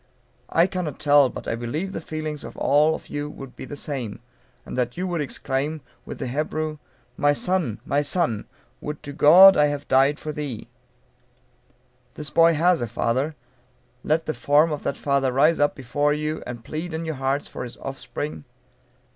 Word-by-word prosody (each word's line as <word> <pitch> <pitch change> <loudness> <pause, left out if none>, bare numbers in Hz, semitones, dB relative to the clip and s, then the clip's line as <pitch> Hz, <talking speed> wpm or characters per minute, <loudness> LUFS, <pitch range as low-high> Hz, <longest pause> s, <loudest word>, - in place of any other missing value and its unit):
I 165 - +4
cannot 180 -6 -3
tell, 145 -2 +5
but - - -8
I - - 0
believe 120 +11 -3
the - - -4
feelings 155 -2 -5
of - - -9
all 150 +2 +3
of - - -10
you 145 0 -4
would 135 -3 -10
be - - -8
the 145 - -7
same, 135 -7 -4 0.5
and - - -7
that 125 +1 -1
you 185 - -1
would 175 -3 -1
exclaim, 145 +2 -2 0.3
with - - -6
the - - -4
Hebrew, 155 +3 -2 0.4
"My 145 0 +3
son! 165 - -1
my 145 - +1
son! 145 - -1 0.3
would 150 0 -6
to 145 -1 -7
God 180 +7 +9
I 150 - +5
had 145 0 -4
died 135 +2 +4
for 155 - -5
thee." 145 -7 -5 1.5
This 150 -2 -6
boy 165 +1 +5
has 170 +2 +3
a 120 - -1
father; 130 +7 -1 0.7
let 160 +4 0
the 155 - -1
form 150 +3 +3
of 150 - -3
that - - -2
father 140 -2 +1
rise 150 +6 +3
up 145 0 +2
before 145 +3 0
you, 155 +1 -2
and 120 -2 -7
plead 160 +2 -4
in 165 +1 -4
your 160 - -2
hearts 135 +2 0
for - - -6
his 120 - -8
offspring. 135 - -6
145 Hz, 185 wpm, -24 LUFS, 135-155 Hz, 1.5 s, God